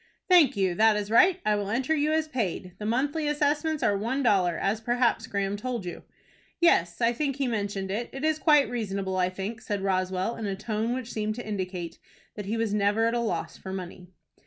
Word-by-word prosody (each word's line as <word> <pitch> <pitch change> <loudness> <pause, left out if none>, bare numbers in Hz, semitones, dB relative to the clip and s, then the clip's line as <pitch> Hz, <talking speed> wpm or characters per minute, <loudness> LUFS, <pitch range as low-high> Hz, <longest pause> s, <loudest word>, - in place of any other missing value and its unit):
"Thank 340 - +5
you; 190 -2 +2
that 220 +3 +4
is 210 0 -4
right. 365 +10 +5
I 210 0 +3
will 205 -1 -2
enter 255 +8 0
you 300 0 +1
as 315 0 +1
paid. 200 - -3
The 210 - -4
monthly 285 +6 0
assessments 295 +1 0
are 205 - +3
one 235 +7 -1
dollar, 185 -7 +3
as 210 +3 -1
perhaps 240 +1 +1
Graham 200 0 -1
told 235 -2 -4
you." 175 - -6 0.6
"Yes, 170 - +3
I 230 0 +3
think 275 +1 -1
he 275 -1 -1
mentioned 200 -4 -2
it. 230 +4 -3
It 270 +3 -4
is 310 0 +1
quite 295 -3 +5
reasonable, 195 -5 -3
I 180 0 +2
think," 195 +5 -5
said 205 -2 -3
Roswell, 185 +3 -1
in 220 - -4
a 195 - -2
tone 220 +3 -2
which 255 -2 -5
seemed 215 0 -2
to 245 - -7
indicate 185 -5 -4 0.3
that 205 -2 -7
he 220 +3 -1
was 225 -2 -1
never 210 +2 +2
at 230 - +1
a 240 - +1
loss 235 -2 -3
for 190 - -8
money. 180 -1 -7
220 Hz, 215 wpm, -27 LUFS, 195-255 Hz, 0.6 s, Thank